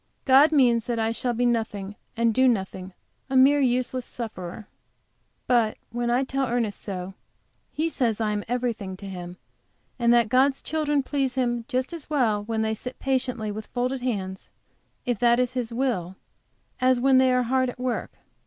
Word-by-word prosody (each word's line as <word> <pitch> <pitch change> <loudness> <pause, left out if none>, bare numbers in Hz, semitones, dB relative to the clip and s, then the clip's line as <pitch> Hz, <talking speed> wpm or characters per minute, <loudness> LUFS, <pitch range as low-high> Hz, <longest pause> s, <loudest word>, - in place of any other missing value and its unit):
God 275 +3 +6
means 245 -6 +3
that 240 -1 -1
I 225 0 +1
shall 240 +1 -1
be 245 +1 0
nothing 215 -4 -1 0.2
and 230 -1 +2
do 260 +3 +4
nothing; 190 -4 -1 0.4
a 265 - -2
mere 275 +3 +6
useless 255 0 0
sufferer. 215 -5 -7 0.8
But 235 -3 +2
when 240 0 -2
I 245 +3 +2
tell 270 0 -1
Ernest 230 -4 -1
so, 185 -1 -5 0.6
he 315 +2 -1
says 240 -9 0
I 215 -2 0
am 205 -1 -2
everything 230 -6 -2
to 200 - -10
him, 180 -1 -7 0.6
and 235 -1 +3
that 235 -2 +4
God's 265 +3 +2
children 295 -2 0
please 270 -2 -1
him 240 -3 0
just 260 +3 -2
as 330 -4 -7
well 230 -9 +1
when 220 0 -1
they 220 0 0
sit 250 +4 -7
patiently 250 -5 -1
with 215 +1 -7
folded 250 +1 -2
hands, 190 -6 -3 0.6
if 245 -4 -1
that 240 0 +4
is 250 0 0
His 245 -3 -2
will, 230 -8 -1 0.6
as 255 -1 +3
when 265 +1 +5
they 260 0 +4
are 250 0 +3
hard 255 +1 +1
at - - -8
work. 250 -1 -2
240 Hz, 180 wpm, -25 LUFS, 220-260 Hz, 0.8 s, God